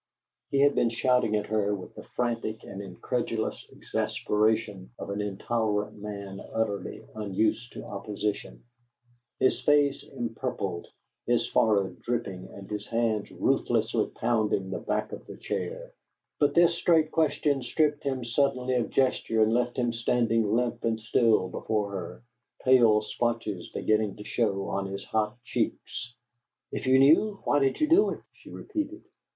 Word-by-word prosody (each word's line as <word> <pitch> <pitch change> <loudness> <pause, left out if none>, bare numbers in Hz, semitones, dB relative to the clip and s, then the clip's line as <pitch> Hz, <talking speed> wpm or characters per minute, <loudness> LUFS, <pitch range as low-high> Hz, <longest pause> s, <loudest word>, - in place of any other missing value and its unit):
He 140 - +2
had 145 0 +5
been 120 - +2
shouting 120 -2 +2
at 105 -1 0
her 105 -1 0
with 95 - -9
the - - -9
frantic 115 -2 -3
and 100 0 -7
incredulous 110 +4 -3
exasperation 105 -3 -1
of - - -6
an 100 +1 -2
intolerant 105 0 -1
man 100 -2 -6
utterly 110 -3 -2
unused 110 +3 -1
to - - -7
opposition; 105 +1 -4 0.8
his 130 - +2
face 145 -1 +3
empurpled, 115 -7 -4 0.4
his 120 0 +2
forehead 100 -4 +2
dripping, 100 -6 -3
and 100 -1 -10
his 105 -1 -5
hands 115 -3 0
ruthlessly - - +1
pounding 110 -5 0
the - - -2
back - - -2
of - - -8
the - - -9
chair; - - -4 0.5
but 145 -1 +3
this 170 0 +6
straight 160 -2 +3
question 150 -3 +1
stripped 150 +3 +1
him 130 -3 -2
suddenly 130 +1 +1
of 120 - 0
gesture 115 -4 +2
and 110 +1 +2
left 120 0 0
him 120 -2 +1
standing 115 -2 +1
limp 120 0 0
and 115 -1 0
still 110 -3 +3
before 105 +2 -2
her, 95 +3 -6 0.4
pale 115 -5 +5
splotches 115 -5 -2
beginning 110 -2 0
to 105 - -9
show 100 -4 0
on 100 0 -2
his 100 0 -6
hot 110 +1 -1
cheeks. 120 0 -3 0.6
"If - - -4
you 130 0 +6
knew, 165 +10 +5
why 145 - +3
did 135 -1 +1
you 305 - +3
do 340 +6 +5
it?" - - -5
she - - -16
repeated. 320 -3 -5
115 Hz, 150 wpm, -28 LUFS, 105-130 Hz, 0.8 s, this